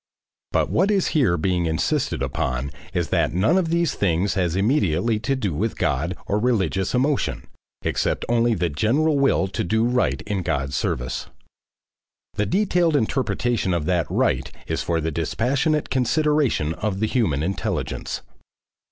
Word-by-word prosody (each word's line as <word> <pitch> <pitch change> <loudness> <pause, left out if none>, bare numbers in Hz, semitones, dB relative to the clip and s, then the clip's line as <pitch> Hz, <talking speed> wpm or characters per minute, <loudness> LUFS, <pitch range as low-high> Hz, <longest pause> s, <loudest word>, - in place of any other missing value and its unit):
But - - +1
what 190 +5 +2
is 200 -3 +2
here 125 - +2
being 90 0 0
insisted 80 -4 0
upon 70 -2 -2 0.2
is 85 -2 -1
that - - +1
none 100 - +3
of 185 -4 +1
these 170 -1 +1
things 95 0 +1
has 90 -3 0
immediately 105 - +1
to 135 +5 0
do 105 - -2
with 105 +9 -2
God 80 +2 0
or 105 - 0
religious 100 -4 0
emotion, 135 +3 0 0.4
except - - -1
only 120 -1 +2
the 85 -2 0
general 140 - +1
will 135 -8 +3
to - - -2
do 110 +6 +1
right 125 +1 +1
in 105 -2 -2
God's 70 -5 -2
service. 60 +1 -2 1.1
The 105 - -1
detailed 180 -4 +2
interpretation 120 -6 0
of 80 -3 -2
that 90 -1 +1
"right" - - 0
is - - -2
for 85 -1 0
the 80 +1 -1
dispassionate 130 - 0
consideration 135 - +1
of 100 +1 -3
the 110 - +2
human 105 - 0
intelligence. 95 +4 -3
105 Hz, 150 wpm, -23 LUFS, 85-130 Hz, 1.1 s, none